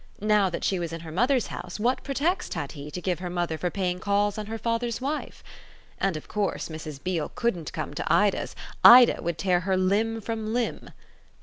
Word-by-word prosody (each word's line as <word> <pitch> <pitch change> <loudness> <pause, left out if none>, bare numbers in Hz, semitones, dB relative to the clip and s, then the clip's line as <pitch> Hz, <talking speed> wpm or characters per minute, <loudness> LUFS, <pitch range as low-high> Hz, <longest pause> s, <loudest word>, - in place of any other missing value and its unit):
Now 210 -2 +3
that 170 - -5
she 190 - +1
was 170 -1 -3
in 165 0 -6
her 165 -1 -8
mother's 245 - +2
house - - -6
what 245 +4 +1
pretext 300 - -1
had 145 -4 -4
he 145 -1 -8
to 180 - -6
give 180 -2 -1
her 180 -1 -4
mother 175 -2 -1
for 180 +3 -2
paying 180 -1 -2
calls 205 +1 +1
on 210 - -5
her 225 +1 -4
father's 230 +1 -1
wife? 285 +4 -4 0.6
And 195 -5 0
of 155 - -10
course 205 -4 -2
Mrs. 155 -2 -7
Beale 175 -4 -1
couldn't 185 -10 -1
come - - -5
to - - -2
Ida's - - +2 0.3
Ida 245 0 +9
would 170 -1 -2
tear 180 -2 +2
her 190 +1 0
limb 210 +5 +1
from 220 0 -4
limb. 245 -1 -2
195 Hz, 205 wpm, -26 LUFS, 175-225 Hz, 0.6 s, Ida